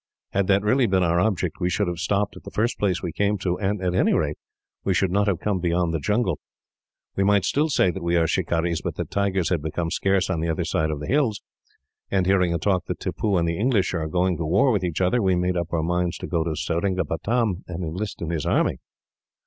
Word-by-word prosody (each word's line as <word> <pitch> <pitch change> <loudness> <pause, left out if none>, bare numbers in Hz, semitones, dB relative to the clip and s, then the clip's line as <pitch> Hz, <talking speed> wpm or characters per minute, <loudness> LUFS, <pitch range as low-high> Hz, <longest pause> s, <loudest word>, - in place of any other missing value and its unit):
Had 100 -1 +1
that 100 0 +3
really 120 +4 +3
been 95 -2 +2
our 85 0 +2
object, 90 -4 0
we 90 -1 +1
should 100 +2 0
have 85 -1 -3
stopped 100 +2 0
at - - -11
the - - -9
first 115 +3 -1
place 95 -4 0
we 85 - -2
came 105 +4 0
to, 90 -2 -2
and, 100 0 -1
at 90 -1 0
any 90 - +3
rate, - - -1 0.4
we 95 - +1
should 95 0 +1
not 100 +2 +2
have 95 -5 +1
come 100 -3 -1
beyond 85 -1 0
the 80 - 0
jungle. 105 0 0 0.8
We 100 - +1
might 100 -1 +3
still 150 +3 +1
say 95 -10 +3
that 95 - -7
we 85 0 0
are 85 -1 +3
shikarees, 85 +1 0
but - - -4
that - - -5
tigers 95 -3 0
had 85 -4 0
become 80 +2 -3
scarce 95 -1 +1
on 85 - -1
the 85 +1 -1
other 80 - -1
side 80 0 0
of 75 -2 -3
the 75 - -5
hills, 130 -7 +1 0.7
and, 95 -2 +1
hearing 90 -2 +3
a 85 - +1
talk 90 +1 0
that - - -4
Tippoo 100 -4 -1
and 85 -1 +1
the 85 0 -2
English 110 -5 +2
are 80 -3 -1
going 90 +1 +1
to 85 - -3
war 100 - +3
with 100 -5 0
each 90 0 -2
other, 95 +7 +2
we 95 -2 +2
made 90 +1 0
up 85 -1 -2
our 80 -2 0
minds 90 +1 0
to - - -6
go 85 -2 0
to 80 -1 -2
Seringapatam, 95 +5 -1
and 90 0 -5
enlist 90 +4 -4
in 85 - -3
his 80 -3 -2
army." - - +1
90 Hz, 245 wpm, -24 LUFS, 85-100 Hz, 0.8 s, that